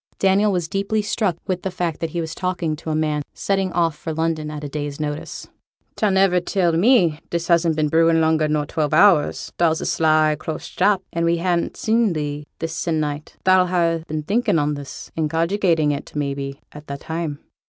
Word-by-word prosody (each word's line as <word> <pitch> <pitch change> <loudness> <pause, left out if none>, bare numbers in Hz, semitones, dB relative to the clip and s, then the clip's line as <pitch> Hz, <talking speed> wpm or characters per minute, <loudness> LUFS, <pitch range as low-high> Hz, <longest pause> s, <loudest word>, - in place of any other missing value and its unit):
Daniel 195 +2 +3
was 175 -3 -1
deeply 200 +4 -1
struck 205 -4 0
with 180 -1 -2
the 190 - -2
fact 175 -3 -3
that 165 - -2
he 170 - -4
was 160 -1 -3
talking 175 -3 -2
to 160 - -8
a 155 - 0
man 155 -1 0
setting 195 -2 0
off 165 -3 +1
for 160 - -6
London 160 -1 -1
at 150 -1 -6
a - - -3
day's 145 0 -5
notice. 150 0 -5 0.5
'Thou'll 210 - +1
niver 190 -1 +4
tell 175 0 +1
me 175 - +3
this 170 0 -3
hasn't 170 -1 +3
been 155 -1 +1
brewin' 165 +1 +3
longer 160 -1 +2
nor 150 -1 0
twelve 155 0 -1
hours; 170 -4 +3
thou's 165 -2 +3
a - - -4
sly 155 -1 +3
close 155 0 -5
chap, 200 -2 +1
and 170 - -1
we 170 0 +2
hannot 175 0 -1
seen 225 -3 +2
thee 150 -1 -4
this 165 0 -4
se'nnight; 155 -3 -2
thou'll 185 -1 +5
ha' 170 -2 +1
been 155 0 -3
thinkin' 205 +2 +1
on 150 0 +1
this, 145 -1 -8
and 155 -2 0
cogitating 165 -2 +1
it, 145 +1 -6
may 145 -2 -1
be, 140 0 -6
a' 150 - -10
that 140 0 -6
time.' 160 -3 -4
165 Hz, 200 wpm, -21 LUFS, 150-180 Hz, 0.5 s, thou'll